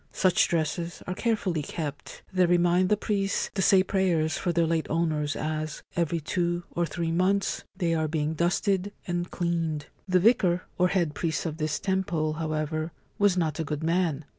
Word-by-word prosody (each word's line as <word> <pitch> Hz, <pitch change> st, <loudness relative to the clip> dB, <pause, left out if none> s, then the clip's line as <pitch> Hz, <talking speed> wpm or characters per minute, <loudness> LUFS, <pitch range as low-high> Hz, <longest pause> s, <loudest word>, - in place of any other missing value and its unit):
Such 185 Hz, -2 st, +3 dB
dresses 170 Hz, +1 st, -2 dB
are 180 Hz, -, -3 dB
carefully 195 Hz, -6 st, 0 dB
kept; 145 Hz, -1 st, -6 dB
they 185 Hz, -1 st, +4 dB
remind 175 Hz, +1 st, +3 dB
the 210 Hz, -, +3 dB
priests 200 Hz, -1 st, -1 dB
to 195 Hz, -, -1 dB
say 190 Hz, 0 st, +5 dB
prayers 175 Hz, -5 st, +1 dB
for 175 Hz, -, -1 dB
their 170 Hz, 0 st, +2 dB
late 165 Hz, -1 st, 0 dB
owners 155 Hz, -3 st, 0 dB
as, 155 Hz, -1 st, -3 dB
every 170 Hz, -1 st, 0 dB
two 175 Hz, +2 st, -1 dB
or 175 Hz, 0 st, 0 dB
three 165 Hz, -1 st, -2 dB
months, 190 Hz, +4 st, +1 dB
they 170 Hz, -4 st, +1 dB
are 160 Hz, -1 st, +1 dB
being 155 Hz, 0 st, -1 dB
dusted 190 Hz, +4 st, 0 dB
and 175 Hz, 0 st, -2 dB
cleaned. 165 Hz, -4 st, -1 dB, 0.2 s
The 185 Hz, -1 st, +4 dB
Vicar 185 Hz, -4 st, +3 dB, 0.2 s
or 180 Hz, -, +5 dB
Head 175 Hz, -5 st, 0 dB
Priest 165 Hz, +1 st, -2 dB
of 160 Hz, -2 st, -3 dB
this 155 Hz, -1 st, -1 dB
temple, 180 Hz, -5 st, 0 dB
however, 155 Hz, 0 st, -2 dB, 0.3 s
was 200 Hz, -2 st, +4 dB
not 160 Hz, -3 st, 0 dB
a -, -, +1 dB
good 150 Hz, 0 st, -4 dB
man. 165 Hz, -3 st, +1 dB
170 Hz, 175 wpm, -27 LUFS, 155-185 Hz, 0.3 s, say